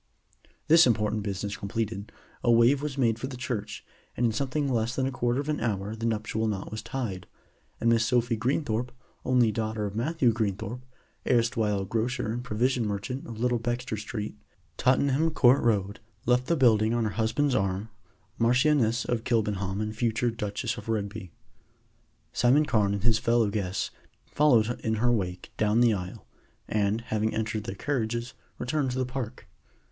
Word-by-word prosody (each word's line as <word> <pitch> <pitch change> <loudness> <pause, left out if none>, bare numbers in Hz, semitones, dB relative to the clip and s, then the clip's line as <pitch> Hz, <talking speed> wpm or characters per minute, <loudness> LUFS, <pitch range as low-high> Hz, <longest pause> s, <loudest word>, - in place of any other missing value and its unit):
This 165 -1 +7
important 105 -2 +1
business 100 0 -3
completed, 105 0 -4 0.3
a 120 - +4
move 120 +4 +5
was 145 -2 -4
made 115 -4 +2
for 130 - -3
the 130 -2 -7
church; 120 -5 -4 0.3
and 120 - +2
in 115 - +3
something 140 +5 -1
less 120 -2 0
than 130 - 0
a 135 - -1
quarter 120 0 0
of 140 - -3
an 150 -1 -1
hour 105 -2 -2
the 115 +1 -2
nuptial 110 0 -1
knot 100 -2 -3
was 110 - -4
tied, 100 -9 -4 0.5
and 115 - 0
Miss 115 -1 +4
Sophie 120 0 +2
Greenthorpe, 120 0 -1 0.3
only 125 -3 +3
daughter 110 0 -2
of 100 0 -5
Matthew 130 +1 +2
Greenthorpe, 110 +2 -3 0.5
erstwhile 110 -4 +2
grocer 115 +2 -1
and 120 +2 -3
provision 125 0 0
merchant 105 +6 -4
of 115 -2 -8
Little 120 0 +1
Bexter 120 0 -2
Street, 105 0 -5 0.4
Tottenham 140 +4 +2
Court 135 -4 +4
Road, 100 -3 0 0.3
left 125 +1 +2
the 170 - +2
building, 115 -5 +4
on 120 - +1
her 110 - -1
husband's 120 +7 +1
arm, 100 -1 -1 0.5
Marchioness 125 0 +3
of 120 -2 -1
Kilbenham 105 -5 0
and 110 0 -3
future 115 +1 0
Duchess 110 +1 -3
of - - -8
Rugby. 100 -4 -3 1.0
Simon 135 +6 +4
Carne 105 -6 +2
and 100 - -5
his 115 -2 +3
fellow 115 -3 +2
guests 100 -2 -2 0.3
followed 120 -6 +3
in 110 0 -1
her 120 +3 +2
wake 90 -5 -2
down 110 +1 +2
the 120 -2 +5
aisle, 90 -2 -6 0.4
and, 105 +1 0
having 110 -1 -1
entered 110 -1 -2
their 95 - -5
carriages, 120 -2 -2 0.2
returned 135 +1 -1
to 125 - -3
the 130 - +1
Park. 125 -2 -6
115 Hz, 170 wpm, -27 LUFS, 105-125 Hz, 1.0 s, This